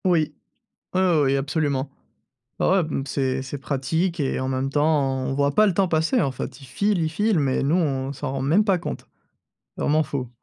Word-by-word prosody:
Oui, 160 -5 +2 0.6
heu, 180 -5 +3
oui 135 0 +2
absolument. 140 -1 -1 0.7
Ouais - - +3
ouais, 190 0 +4
b 155 - -7
mmh, 135 - -2
c'est 130 0 -1
c'est 135 +2 -6
pratique 160 +6 -1
et 135 - 0
en 130 - -2
même 135 +1 -1
temps 145 -2 +2
on 135 - -2
voit 140 0 +1
pas 215 - +6
le 195 - +1
temps 190 +1 +2
passer 165 +9 +2
en 140 - +1
fait. 130 - -6
Il 135 - -12
file, 205 +8 0
il 160 - +1
file, 205 +3 +1
mais 135 -2 +1
nous, 145 +4 +2
on 135 -6 0
s'en 140 0 -5
rend 135 -1 -2
même 165 +10 +3
pas 195 -4 +2
compte. 175 - -6 0.7
Vraiment 155 +2 +2
fou. 135 -4 -4
145 Hz, 215 wpm, -23 LUFS, 135-170 Hz, 0.7 s, pas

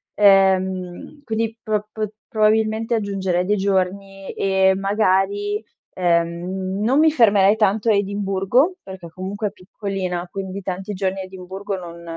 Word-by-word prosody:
Ehm, 190 +4 +2
quindi 225 -1 -2
pr 210 -2 -1
p 215 -1 -3 0.3
probabilmente 220 +1 +2
aggiungerei 190 -4 -1
dei 205 +3 +2
giorni 195 0 -1
e 190 -1 +3
magari, 200 +1 +1 0.3
ehm, 180 +2 -1
non 260 +6 +3
mi 315 - +6
fermerei 205 -6 +5
tanto 210 +1 +2
a - - +5
Edimburgo, 200 - +1
perché 190 -3 -9
comunque 190 +5 -4
è - - -20
piccolina, 185 -2 -4
quindi 195 0 -5
tanti 190 +2 -4
giorni 190 0 -2
a - - -5
Edimburgo, 190 +1 -6
non 170 -1 -9
195 Hz, 135 wpm, -21 LUFS, 185-210 Hz, 0.3 s, mi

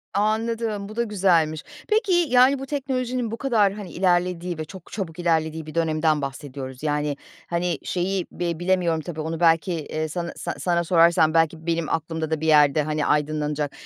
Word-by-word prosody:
Anladım, 215 0 -1
bu 215 - -9
da 235 - +1
güzelmiş. 175 -7 +1 0.3
Peki, 430 -2 +2
yani, 275 -6 +4
bu 270 - -5
teknolojinin 255 -4 -2
bu 230 - -4
kadar, 220 -8 +2
hani, 200 -4 -8
ilerlediği 180 -1 0
ve 155 - -4
çok 185 +2 -12
çabuk 180 -5 -5
ilerlediği 160 -2 0
bir 155 - -10
dönemden 155 -2 +1
bahsediyoruz. 135 -1 -7
Yani, 150 -1 0 0.3
hani, 170 -2 -1
şeyi 185 +1 -1
bi 170 -2 -3
bilemiyorum 175 -3 +1
tabii 160 -1 -6
onu 160 +1 -4
belki, 165 +2 +3
eee, 155 -1 -3
sana 170 +2 -4
sa - - -4
sana 170 -1 +1
sorarsam 165 -1 +4
belki 165 0 +1
benim 165 -2 -1
aklımda 160 0 -2
da 160 -1 -1
bir 160 - -1
yerde, 150 -1 +5
hani, 150 0 -1
aydınlanacak. 150 -1 0
170 Hz, 175 wpm, -24 LUFS, 155-200 Hz, 0.3 s, yerde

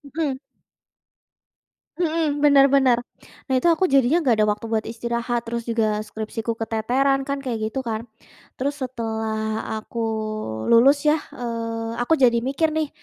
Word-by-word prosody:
Hmm. 290 -5 -1 1.6
Hmm. 320 -3 0
Bener 280 -2 +7
bener. 265 -3 +4 0.5
Nah, - - +1
itu 255 - +1
aku 370 +3 +1
jadinya 275 +5 +3
nggak 255 -7 +3
ada 215 - +5
waktu 210 +2 -5
buat 220 -1 0
istirahat, 235 +1 -2
terus 235 0 -3
juga 220 -2 0
skripsiku 220 +1 -4
keteteran 250 +5 +1
kan 280 0 -1
kayak 245 -4 -2
gitu 265 - -3
kan. 230 -2 -4 0.5
Terus 280 +2 -1
setelah 220 -3 -3
aku 230 +2 -8 0.7
lulus 255 +5 +6
ya, 305 - +4 0.2
eee, 230 -1 -4
aku 245 +7 +2
jadi 235 -2 +5
mikir 280 +5 +1
nih, 315 -1 0
240 Hz, 145 wpm, -23 LUFS, 225-275 Hz, 1.6 s, Bener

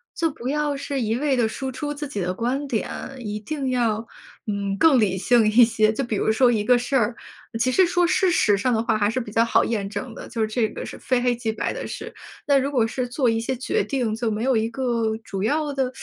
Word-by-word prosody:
就 330 -2 +1
不 255 -3 -6
要 295 0 0
是 275 0 -3
一 225 0 0
味 275 0 +1
地 235 - +3
输 265 +4 -4
出 295 +3 -4
自 295 +1 -5
己 270 -7 -5
的 180 -1 -1
观 255 +7 -2
点， 230 -5 -2 0.3
一 210 -3 -4
定 275 +3 -3
要， 230 -3 0 0.4
嗯， 200 -1 -2
更 285 -3 +5
理 190 -3 +1
性 230 +3 +3
一 225 +3 +6
些。 220 -1 +3
就 270 - -2
比 225 -3 -2
如 - - 0
说 240 +3 +4
一 220 -3 +1
个 245 +3 +4
事 245 +3 -5
儿， 230 -1 +1 0.4
其 255 +3 +1
实 375 +7 +5
说 355 0 +2
事 370 +1 +2
实 210 - +3
上 250 +5 +1
的 225 0 +1
话 225 -2 +1
还 205 -1 +2
是 230 - -3
比 210 - -8
较 230 +1 +3
好 - - +3
验 205 -4 -2
证 210 +4 -5
的， - - -9
就 225 -2 -1
这 220 +1 0
个 - - -7
是 - - -9
非 250 -1 0
黑 245 -1 +2
即 230 -2 -3
白 - - -2
的 - - -5
事。 - - -7 0.3
那 280 -1 +5
如 275 - -1
果 250 -6 +2
是 250 +2 -3
做 245 0 +1
一 225 0 +1
些 255 +3 -2
决 255 - -1
定， 250 -6 -1
就 225 +1 -1
没 215 +2 -2
有 260 -2 +2
一 220 0 +1
个 230 -3 -1
主 195 -3 -5
要 295 +7 0
的， 265 -2 -1
240 Hz, 275 characters per minute, -23 LUFS, 220-270 Hz, 0.4 s, 一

